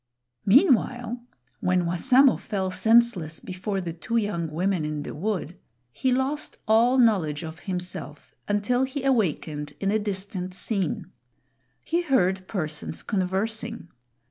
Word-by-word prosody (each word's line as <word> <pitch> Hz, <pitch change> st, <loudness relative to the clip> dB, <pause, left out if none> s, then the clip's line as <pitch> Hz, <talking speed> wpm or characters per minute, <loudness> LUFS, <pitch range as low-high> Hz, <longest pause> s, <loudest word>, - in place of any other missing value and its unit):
Meanwhile, 245 Hz, -, +3 dB, 0.4 s
when 180 Hz, -1 st, +1 dB
Wassamo 255 Hz, +10 st, +4 dB
fell 190 Hz, -2 st, -3 dB
senseless 220 Hz, -7 st, +3 dB
before 190 Hz, +2 st, -4 dB
the 170 Hz, -3 st, -4 dB
two 170 Hz, +8 st, -2 dB
young 200 Hz, -7 st, -1 dB
women 180 Hz, +2 st, 0 dB
in 150 Hz, -1 st, -3 dB
the -, -, -6 dB
wood, 180 Hz, -1 st, -3 dB, 0.3 s
he 260 Hz, -, 0 dB
lost 270 Hz, +4 st, -1 dB
all 235 Hz, +4 st, +4 dB
knowledge 185 Hz, -, +3 dB
of 160 Hz, +1 st, -7 dB
himself 180 Hz, -5 st, -5 dB
until 205 Hz, +5 st, +1 dB
he 265 Hz, +1 st, -3 dB
awakened 155 Hz, -, 0 dB
in 195 Hz, 0 st, 0 dB
a 220 Hz, -, +2 dB
distant 190 Hz, -3 st, -4 dB
scene. 190 Hz, -3 st, -2 dB, 0.7 s
He 340 Hz, +2 st, +1 dB
heard 190 Hz, -, +1 dB
persons 155 Hz, -5 st, -3 dB
conversing. 215 Hz, +2 st, -2 dB
195 Hz, 125 wpm, -26 LUFS, 175-235 Hz, 0.7 s, Wassamo